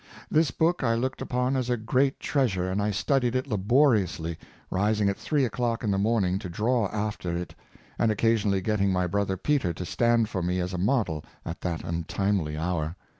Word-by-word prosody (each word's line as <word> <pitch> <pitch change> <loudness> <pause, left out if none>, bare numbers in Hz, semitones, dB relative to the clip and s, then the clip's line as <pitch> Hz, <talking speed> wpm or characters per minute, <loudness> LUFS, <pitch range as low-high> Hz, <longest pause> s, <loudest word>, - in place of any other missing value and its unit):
This 155 -1 +3
book 165 +5 +1
I 115 -2 +2
looked 130 +3 -2
upon 125 +2 0
as 130 -2 -1
a 125 - +1
great 130 +5 +1
treasure, 95 -10 0
and 100 +2 0
I 105 - +1
studied 120 +5 +1
it 130 - 0
laboriously, 105 - +2 0.4
rising 105 +1 +2
at 100 - -1
three 145 -4 +1
o'clock 120 -1 -1
in 105 - +1
the 95 - +1
morning 100 -3 +1
to 95 - -6
draw 110 +5 +1
after 105 -4 -3
it, 90 0 -5 0.5
and 115 - +3
occasionally 105 -3 +2
getting 100 -1 +1
my 90 -1 +1
brother 95 +1 -1
Peter 135 - +1
to 90 - -6
stand 115 +4 +2
for 95 -3 -3
me 90 +1 0
as 90 +1 -2
a 90 - -2
model 95 - 0 0.2
at 85 - -6
that 85 -3 -3
un 85 0 -3
timely 95 -7 0
hour. 80 -1 -2
105 Hz, 195 wpm, -27 LUFS, 90-120 Hz, 0.5 s, This